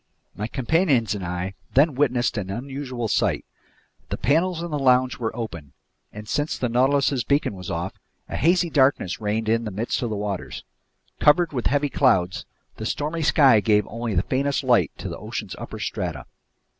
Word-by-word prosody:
My 105 - -3
companions 130 - +1
and 100 -3 -5
I 90 +2 -3 0.2
then 145 +3 +5
witnessed 125 -3 +1
an 100 -4 -3
unusual 125 +1 -4
sight. - - 0 0.6
The - - -3
panels 165 +7 +1
in 170 - -5
the 150 - -1
lounge 130 -1 +3
were 115 -2 -3
open, 85 - -6 0.4
and 105 0 -9
since 145 +5 -1
the 125 - -1
Nautilus's 135 +1 +2
beacon 140 0 +1
was 90 -2 -8
off, - - -3 0.3
a - - -5
hazy 170 +1 +2
darkness 130 -9 +2
reigned 110 +1 -1
in 115 +1 +2
the 110 - -3
midst 105 +4 -2
of 120 - -1
the 110 - -2
waters. 100 -2 -4 0.6
Covered 165 +2 +4
with 125 -3 -1
heavy 145 +1 +1
clouds, 95 -11 +2 0.3
the 110 - -5
stormy 155 +5 -2
sky 135 -6 +5
gave 105 0 +2
only 115 -1 -3
the 90 - +2
faintest 140 +2 0
light 120 - +3
to - - -6
the - - -6
ocean's - - -5
upper - - -7
strata. - - -4
125 Hz, 180 wpm, -24 LUFS, 105-145 Hz, 0.6 s, then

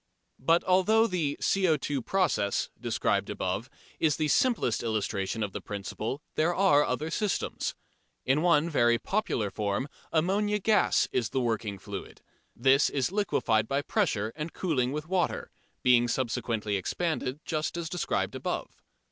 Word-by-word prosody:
But 165 +6 +3
although 190 +5 +4
the 165 -9 -1
"CO_ 155 -8 +1
process" 155 - 0
described - - 0
above 95 +7 -3 0.3
is 155 -3 +3
the 155 -1 0
simplest 235 - +2
illustration 105 -1 -1
of 100 - -3
the - - -5
principle, 110 +6 -5
there 170 +3 +1
are 180 -7 +5
other 150 +5 -2
systems. 210 +3 -1 0.5
In 135 +4 +2
one 170 -2 +4
very 120 -7 +3
popular 120 - -1
form 105 +5 -1 0.2
ammonia 200 +6 +1
gas 210 +1 +3
is 120 -3 0
the 135 - -1
"working 110 -4 -1
fluid." 100 +1 -8 0.4
This 135 +3 +4
is 140 +4 -1
liquefied 115 - +1
by 140 +1 0
pressure 115 - 0
and 155 +1 -5
cooling 130 -9 0
with 150 +2 -4
water, 185 -1 -1 0.3
being 120 -1 +5
subsequently 115 -4 -1
expanded 140 - -2
just 155 +1 -2
as 170 -1 -3
described 175 +3 -1
above. - - -4
145 Hz, 140 wpm, -28 LUFS, 115-175 Hz, 0.5 s, are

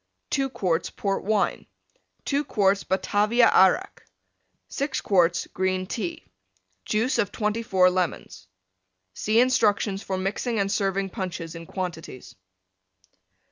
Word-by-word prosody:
2 270 -1 0
quarts 180 -9 -1
Port 195 -1 -2
Wine. 210 0 0 0.6
2 285 +1 0
quarts 200 -6 +1
Batavia 210 +5 +2
Arrack. 190 -1 +3 0.7
6 280 0 -2
quarts 175 -3 +2
green 185 0 -1
Tea. 185 -2 -5 0.6
Juice 230 +3 0
of 205 -4 0
24 210 -4 +2
Lemons. 180 - -3 0.7
(See 215 - +1
instructions 210 -5 +2
for 190 -3 -3
mixing 205 +5 -2
and 200 -1 0
serving 195 -2 -1
Punches 175 -5 -5
in 165 -1 -9
quantities.) 170 -8 -6
195 Hz, 110 wpm, -25 LUFS, 185-220 Hz, 0.7 s, Arrack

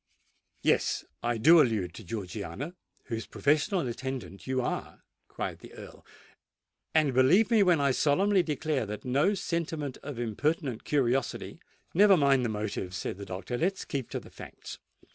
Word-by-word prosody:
"Yes—I 120 0 0
do 160 +8 +7
allude 105 - 0
to 110 - -10
Georgiana, 105 - -5 0.3
whose 115 -1 -5
professional 155 - +1
attendant 125 -4 -6
you 130 0 0
are," 125 - -4 0.2
cried - - -5
the - - -13
Earl. - - -12 0.9
"And 150 -4 +3
believe 160 - +4
me 225 -2 +5
when 180 -5 +4
I 140 -1 +3
solemnly 185 +9 +3
declare 150 -6 -1
that 105 +4 -6
no 145 +11 +2
sentiment 165 -6 -3
of 145 -3 -7
impertinent 125 +2 -1
curiosity——" 135 -3 0 0.3
"Never 200 +1 +6
mind 140 -4 +4
the 120 - 0
motives," 105 -3 -3
said - - -4
the 100 - -6
doctor: 100 +7 -5
"let 185 +4 +2
us - - -8
keep 135 -4 -4
to - - -3
the - - -15
facts. - - -10
135 Hz, 155 wpm, -29 LUFS, 115-160 Hz, 0.9 s, do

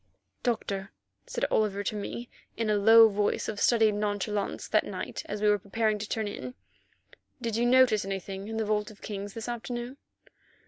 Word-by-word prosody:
"Doctor," 200 -5 -2 0.4
said - - -1
Oliver 205 -2 +1
to 215 - -2
me 235 +3 -5 0.3
in 225 -2 0
a 210 - +2 0.3
voice 205 -1 0
of 210 -2 -4
studied 225 -3 +4
nonchalance 205 0 -2
that - - +3
night, - - -5
as 210 0 -4
we - - +4
were 210 0 +4
preparing 215 +2 0
to 210 - -5
turn 220 -2 -1
in, 250 +4 -6 0.8
"did 230 -3 -2
you 240 +1 +2
notice 250 -4 +5
anything 195 0 -5
in 220 0 -4
the 220 - 0
Vault 210 0 0
of 215 - -15
Kings 200 -1 -6
this 225 0 -5
afternoon?" 240 +2 -5
215 Hz, 175 wpm, -28 LUFS, 205-230 Hz, 0.8 s, notice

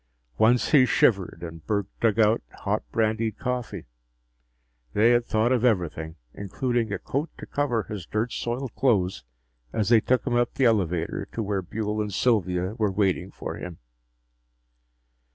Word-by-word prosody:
Once 120 +2 +4
he 145 -5 +7
shivered, 95 -8 +2
and 80 -1 -8
Burke 100 +1 0
dug 115 -1 +2
out 110 +1 +4 0.2
hot 105 +2 0
brandied 110 -1 0
coffee. 125 -1 -4 1.1
They 115 +3 +4
had 120 0 +2
thought 110 +3 +2
of 125 -2 +2
everything, 85 -8 0 0.2
including 115 +3 -2
a - - -1
coat 145 +4 -3
to - - -8
cover 125 -6 -1
his 95 -4 -7
dirt 110 +3 -1
soiled 120 +1 -3
clothes 100 -9 +1 0.5
as 105 -2 0
they 115 -2 +6
took 130 +3 +1
him 125 - -1
up 120 +1 +1
the 135 -1 +2
elevator 90 -8 0
to 115 - -2
where 100 -1 -1
Buehl 105 +3 -3
and 105 -1 -3
Sylvia 95 -4 +1
were 105 -3 +2
waiting 95 -2 0
for - - -6
him. 90 -2 -7
110 Hz, 155 wpm, -25 LUFS, 95-120 Hz, 1.1 s, he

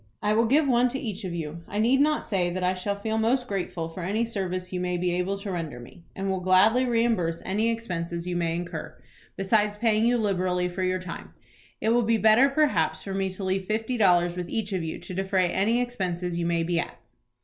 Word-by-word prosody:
"I 210 - +1
will 225 +1 +3
give 285 +4 +3
one 245 -1 +4
to 265 +2 -3
each 210 -7 -5
of 175 -2 -4
you. 165 0 -5
I 205 - -5
need 245 +6 +3
not 305 +1 +2
say 185 -5 0
that 180 +1 -3
I 180 +1 +2
shall 195 +2 -2
feel 220 +2 -2
most 245 +3 +1
grateful 180 -5 -3
for 165 +3 -8
any 205 +7 0
service 185 -4 -4
you 180 - -1
may 180 0 -1
be 175 0 0
able 180 +3 -1
to 200 0 -5
render 160 -8 -4
me, 120 +8 -13
and 195 0 -3
will 190 -1 0
gladly 195 +8 +4
reimburse 225 -9 +1
any 210 +4 +1
expenses 170 -7 -3
you 180 -1 -3
may 165 -1 0
incur, 175 +1 -6 0.4
besides 210 +1 +1
paying 220 -1 +2
you 245 0 +3
liberally 180 -4 0
for 180 +2 -5
your 185 0 +1
time. 180 -2 -8 0.4
It 220 - 0
will 240 +1 +4
be 230 0 +2
better 220 +5 +5
perhaps 215 - +1
for 195 - -5
me 195 0 0
to 185 +1 -7
leave 190 0 -1
fifty 220 +3 -1
dollars 175 -5 +3
with 180 -1 -5
each 215 -3 -2
of 185 -3 -1
you 160 - -4
to 175 +1 -9
defray 190 -1 +1
any 220 +5 +2
expenses 180 -8 -2
you 170 0 -1
may 170 -1 +1
be 170 0 0
at." - - -4
190 Hz, 230 wpm, -26 LUFS, 175-225 Hz, 0.4 s, better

